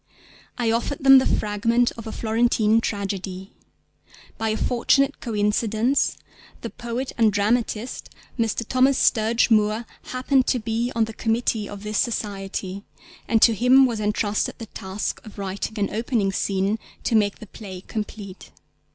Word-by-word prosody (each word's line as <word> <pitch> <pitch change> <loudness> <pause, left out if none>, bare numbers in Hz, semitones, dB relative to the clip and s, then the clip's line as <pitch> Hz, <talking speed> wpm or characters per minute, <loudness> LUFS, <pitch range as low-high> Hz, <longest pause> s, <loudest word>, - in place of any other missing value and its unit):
I 235 -2 +1
offered 235 +5 -2
them 270 -1 +9
the 260 - 0
fragment 230 +3 +1
of 230 -1 -10
A - - -4
Florentine 225 -1 +2
Tragedy. 195 -2 -4 0.8
By 225 0 -2
a 215 - -1
fortunate 275 +3 +2
coincidence 220 +3 0 0.4
the - - -6
poet 240 +2 -4
and 220 -2 +5
dramatist, 220 +3 -1 0.3
Mr. 230 -1 -1
Thomas 260 +1 +3
Sturge 230 +1 +2
Moore, 215 +1 +2 0.2
happened 255 +1 +1
to - - +2
be 230 +1 -2
on 230 - +3
the 225 - -8
committee 225 -1 -1
of 205 0 -9
this 210 0 -1
Society, 200 -4 -3 0.4
and 225 -1 +3
to 230 - +7
him 250 +5 +5
was 235 -4 -2
entrusted 210 0 -1
the 225 - -7
task 195 -1 -5
of 215 -2 -13
writing 200 +2 -4
an 200 -1 -1
opening 225 -3 0
scene 195 +2 0 0.2
to - - -1
make 205 -2 +2
the - - -10
play 190 -3 -9
complete. 205 -2 -7
220 Hz, 150 wpm, -23 LUFS, 205-235 Hz, 0.8 s, them